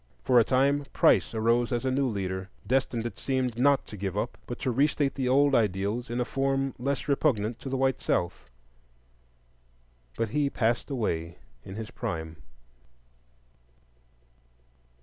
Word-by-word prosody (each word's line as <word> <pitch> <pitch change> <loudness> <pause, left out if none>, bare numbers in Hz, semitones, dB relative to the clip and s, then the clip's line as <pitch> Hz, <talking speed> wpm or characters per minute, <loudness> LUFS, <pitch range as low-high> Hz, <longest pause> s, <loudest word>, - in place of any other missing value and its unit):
For 125 -2 +5
a - - +6
time 140 +4 +2
Price - - +4
arose 115 +2 +2
as 120 +1 -1
a 130 - +1
new 135 +1 +1
leader, 95 -3 -3 0.2
destined, 125 -2 0
it 120 - -5
seemed, 130 -3 -1
not 140 +1 +4
to - - -9
give 100 -1 -4
up, 115 +3 -2
but 120 - -5
to 130 -3 0
re 135 +5 +4
state 145 -2 -1
the 130 -2 -1
old 140 +2 +4
ideals 105 +1 0
in 120 +1 -2
a 125 - +1
form 135 0 0
less 135 +3 -2
repugnant 120 -6 +1
to 135 - -6
the 135 - -1
white 130 0 +1
South. 85 - -1 1.7
But 115 - 0
he 145 +4 +1
passed 120 0 0
away 85 - -2 0.3
in 95 - -9
his 110 +2 -6
prime. 80 -10 -5
120 Hz, 155 wpm, -28 LUFS, 110-135 Hz, 1.7 s, a